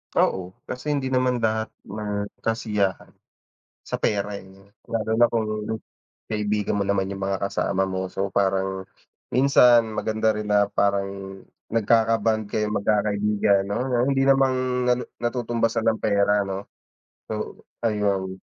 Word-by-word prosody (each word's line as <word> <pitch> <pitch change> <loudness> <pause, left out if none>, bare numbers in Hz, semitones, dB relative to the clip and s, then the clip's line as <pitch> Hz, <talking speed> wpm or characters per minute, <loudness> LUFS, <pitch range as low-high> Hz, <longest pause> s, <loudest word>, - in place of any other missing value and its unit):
Oo, 95 0 +1
kasi 125 +4 -7
hindi 130 -2 -2
naman 125 -2 +1
lahat 110 0 +1 0.2
ng 105 0 -4
kasiyahan, 105 -4 -1 0.7
sa - - -4
pera 100 -1 -1
eh, 95 - -14
'no, 95 +1 -19 0.2
lalo 115 -1 -2
na 120 - +7
kung, 110 -2 -2 0.6
kaibigan 105 -1 -1
mo 100 - +1
naman 100 -1 0
yung 95 0 -6
mga 95 0 0
kasama 95 0 0
mo 95 -1 -3
so 95 0 -3
parang, 95 -1 +1 0.5
minsan 125 -3 +5
maganda 110 0 +1
rin 105 0 -4
na 100 0 +4
parang 100 -1 +1 0.6
nagkaka-bond 110 -1 +2
kayong 105 0 -1
mag-kakaibigan 105 -1 +2
'no, 100 +1 -3 0.3
hindi 135 0 +2
naman 135 -1 +4 0.4
na - - +6 0.3
natutumbasan 120 -2 0
ng 110 -1 +1
pera 100 0 +3
'no. 95 0 -5 0.7
So, - - -5 0.2
ayun, 100 -3 0
105 Hz, 135 wpm, -24 LUFS, 100-115 Hz, 0.7 s, na